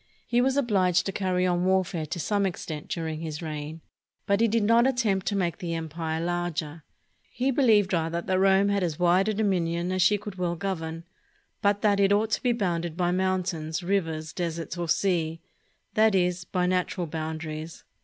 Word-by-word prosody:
He 240 Hz, +1 st, +2 dB
was 265 Hz, +2 st, +1 dB
obliged 190 Hz, -9 st, +2 dB
to 195 Hz, -, -1 dB
carry 185 Hz, -2 st, 0 dB
on 175 Hz, -1 st, +1 dB
warfare 185 Hz, -3 st, +1 dB
to 175 Hz, -, -4 dB
some 200 Hz, +5 st, 0 dB
extent 155 Hz, -4 st, -6 dB
during 160 Hz, -2 st, -3 dB
his 160 Hz, 0 st, -5 dB
reign, 155 Hz, 0 st, -6 dB, 0.4 s
but 200 Hz, +2 st, +2 dB
he 230 Hz, -, +5 dB
did 225 Hz, 0 st, +1 dB
not 230 Hz, +4 st, +5 dB
attempt 220 Hz, -8 st, 0 dB
to 205 Hz, -, 0 dB
make 175 Hz, -4 st, -1 dB
the 170 Hz, -2 st, -3 dB
empire 160 Hz, 0 st, -3 dB
larger. 170 Hz, -2 st, -3 dB, 0.5 s
He 260 Hz, +2 st, 0 dB
believed 220 Hz, -8 st, +3 dB
rather 165 Hz, 0 st, 0 dB
that 185 Hz, +2 st, 0 dB
Rome 195 Hz, +1 st, +4 dB
had 200 Hz, -1 st, +1 dB
as 165 Hz, -4 st, -1 dB
wide 180 Hz, +3 st, +3 dB
a -, -, +1 dB
dominion 180 Hz, -4 st, 0 dB
as 185 Hz, 0 st, 0 dB
she 205 Hz, +4 st, +4 dB
could 205 Hz, -2 st, -9 dB
well 175 Hz, -1 st, 0 dB
govern, 165 Hz, -3 st, -4 dB, 0.6 s
but 205 Hz, +1 st, +1 dB
that 205 Hz, -2 st, +3 dB
it 200 Hz, 0 st, +4 dB
ought 215 Hz, +2 st, +2 dB
to -, -, 0 dB
be 250 Hz, -, +2 dB
bounded 175 Hz, -7 st, -1 dB
by 175 Hz, -1 st, +1 dB
mountains, 180 Hz, -3 st, -1 dB
rivers, 165 Hz, -5 st, -1 dB
deserts, 170 Hz, -1 st, -3 dB
or 170 Hz, -1 st, -4 dB
seas, 165 Hz, -3 st, +1 dB, 0.6 s
that 215 Hz, -1 st, +4 dB
is, 180 Hz, -1 st, +1 dB
by 180 Hz, -1 st, -1 dB
natural 180 Hz, 0 st, 0 dB
boundaries. 160 Hz, 0 st, -5 dB
180 Hz, 185 wpm, -26 LUFS, 165-200 Hz, 0.6 s, he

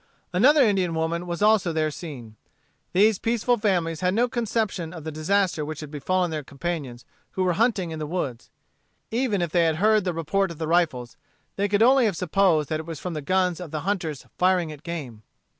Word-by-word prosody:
Another 270 Hz, +10 st, +5 dB
Indian 190 Hz, -7 st, +1 dB
woman 165 Hz, +2 st, -2 dB
was 175 Hz, +3 st, -2 dB
also 210 Hz, -5 st, +4 dB
there 155 Hz, -1 st, 0 dB
seen. 135 Hz, -8 st, -9 dB, 0.6 s
These 205 Hz, +2 st, +4 dB
peaceful 235 Hz, +1 st, +1 dB
families 175 Hz, -7 st, 0 dB
had 180 Hz, +1 st, +1 dB
no 240 Hz, +2 st, +3 dB
conception 220 Hz, -7 st, -2 dB
of 165 Hz, -3 st, -8 dB
the 160 Hz, -, -5 dB
disaster 170 Hz, +1 st, 0 dB
which 155 Hz, 0 st, -5 dB
had 150 Hz, -2 st, -8 dB
befallen 180 Hz, +4 st, 0 dB
their 155 Hz, -2 st, -3 dB
companions 140 Hz, -4 st, -5 dB, 0.3 s
who 190 Hz, -, 0 dB
were 180 Hz, -1 st, +2 dB
hunting 205 Hz, -4 st, +1 dB
in 160 Hz, -, -5 dB
the 155 Hz, -, -4 dB
woods. 145 Hz, -8 st, -4 dB, 0.6 s
Even 225 Hz, -6 st, 0 dB
if 170 Hz, -, -3 dB
they 170 Hz, -1 st, +3 dB
had 160 Hz, -1 st, +2 dB
heard 215 Hz, +4 st, +3 dB
the 180 Hz, -, -1 dB
report 180 Hz, +4 st, 0 dB
of 170 Hz, -, -8 dB
the 160 Hz, 0 st, -3 dB
rifles, 155 Hz, -8 st, 0 dB, 0.4 s
they 200 Hz, +1 st, 0 dB
could 205 Hz, +2 st, +3 dB
only 260 Hz, +1 st, +5 dB
have 200 Hz, -6 st, 0 dB
supposed 180 Hz, -4 st, +2 dB
that 155 Hz, -, -1 dB
it 160 Hz, -, -8 dB
was 165 Hz, -3 st, -6 dB
from 180 Hz, -, -5 dB
the 155 Hz, -, -4 dB
guns 185 Hz, +2 st, +1 dB
of 180 Hz, -3 st, -7 dB
the 155 Hz, 0 st, -4 dB
hunters 170 Hz, -7 st, -3 dB
firing 180 Hz, -3 st, +2 dB
at 150 Hz, -2 st, -10 dB
game. 145 Hz, -11 st, -6 dB
175 Hz, 210 wpm, -25 LUFS, 155-200 Hz, 0.6 s, Another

